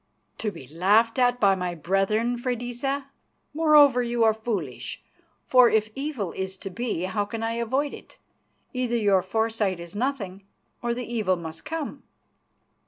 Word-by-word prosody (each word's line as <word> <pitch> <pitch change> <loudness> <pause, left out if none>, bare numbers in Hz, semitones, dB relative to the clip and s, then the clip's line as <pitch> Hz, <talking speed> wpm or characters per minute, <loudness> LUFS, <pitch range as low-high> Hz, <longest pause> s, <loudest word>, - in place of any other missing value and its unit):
"To 215 - -1
be 170 - -10
laughed 205 - +3
at 245 0 +3
by 200 -3 +5
my 180 -2 -2
brethren, 195 +8 +1
Freydisa? 250 +3 -3 0.4
Moreover, 295 -5 +6
you 240 -1 0
are 220 -1 +5
foolish, 210 - -4 0.4
for 250 -2 +6
if 215 0 +1
evil 270 - -3
is 190 0 -5
to 195 - -7
be, 230 -5 -2
how 205 +3 0
can 225 +2 -5
I 225 - 0
avoid 270 +5 0
it? - - -12 0.6
Either 250 -2 0
your 200 -4 +3
foresight 220 -3 0
is 170 +2 -9
nothing 205 -6 -2 0.4
or 235 0 -1
the 250 0 -4
evil 215 -6 0
must 165 -2 -8
come." 315 -1 -4
225 Hz, 155 wpm, -26 LUFS, 195-245 Hz, 0.6 s, Moreover